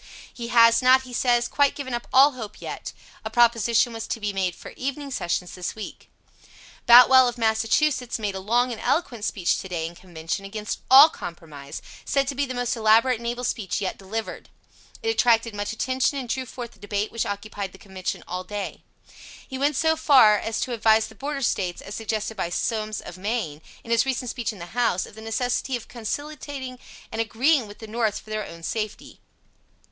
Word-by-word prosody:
He 235 -1 -6
has 230 0 +6
not, 260 +1 +5
he 255 -1 -11
says, 240 0 +2
quite 285 +1 +2
given 265 -3 -5
up 240 0 -3
all 275 +3 +7
hope 220 -5 -8
yet. - - -6 0.3
A - - -4
proposition 235 -1 +3
was 225 0 -5
to - - -3
be 210 -1 -2
made 185 -2 -1
for - - -11
evening 275 +1 -5
sessions 180 -6 -2
this 180 -1 -5
week. 215 - -9 0.8
Boutwell, 250 +2 +9
of 240 0 -3
Massachusetts, 230 +4 +1
made 210 -3 -2
a 190 - -5
long 240 +6 +1
and 230 - -6
eloquent 245 -9 -1
speech, 185 -3 0
to 190 - -8
day, 170 -3 -2
in 165 - -6
Convention, 170 +1 -5
against 210 +1 -5
all 275 +4 +10
compromise, 155 - -9 0.2
said 275 -1 +1
to 280 - -1
be 280 +1 -1
the 255 - -5
most 245 0 -1
elaborate 225 +2 +4
and 235 - -6
able 240 +1 -3
speech 215 -5 -2
yet 195 -2 -3
delivered. 215 +3 -5 0.5
It 450 - 0
attracted 230 - +3
much 205 0 -3
attention 260 +5 0
and 260 -3 -4
drew 255 +2 -2
forth 240 -2 -7
the - - -22
debate 205 +1 -2
which 230 - -2
occupied 200 -1 -5
the 190 - -14
Convention 190 -2 -5
all 180 +1 -4
day. 205 0 -5 0.7
He 265 - -6
went 290 +1 +1
so 320 +3 +2
far 260 -9 +6
as 225 0 -3
to 250 - -2
advise 220 0 +3
the - - -14
Border 275 +5 -4
States, 180 -6 -1
as 195 - -9
suggested 220 0 -3
by 185 -4 -2
Somes, 215 +3 -2
of 180 - -10
Maine, 190 -8 -3 0.2
in 230 - -8
his 230 +3 +3
recent 255 -2 -2
speech 240 -3 -3
in 210 - -12
the 170 -1 -10
House, 230 -6 +1
of - - -14
the 220 - -11
necessity 245 +3 -1
of 240 - -7
conciliating 260 +1 -6 0.3
and 225 - -1
agreeing 245 +3 +2
with 205 - -12
the 220 - -9
North 220 -1 -1
for 215 - -14
their 215 -1 -3
own 165 0 -11
safety. 215 +2 -4
225 Hz, 205 wpm, -24 LUFS, 205-255 Hz, 0.8 s, all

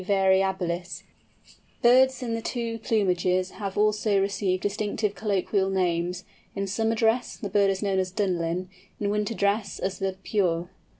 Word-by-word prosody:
variabilis_. 190 -2 +1 0.8
Birds 260 +2 +5
in 230 -2 -2
the 230 - -2
two 230 -1 -3
plumages 185 -4 +1
have 200 -3 -5
also 210 -1 +2
received 195 -1 0
distinctive 205 0 -1
colloquial 200 -2 0
names; 180 -1 0 0.3
in 200 0 -1
summer 225 +3 0
dress, 225 +2 +1
the 205 - -5
bird 200 -1 +4
is 195 +1 -1
known 195 -2 +1
as 185 -1 0
"Dunlin," 180 -2 -1 0.3
in 205 -1 0
winter 210 +2 -1
dress 200 -1 0
as 190 0 -3
the 190 -1 -2
"Purre." 175 -4 0
195 Hz, 145 wpm, -26 LUFS, 185-215 Hz, 0.8 s, Birds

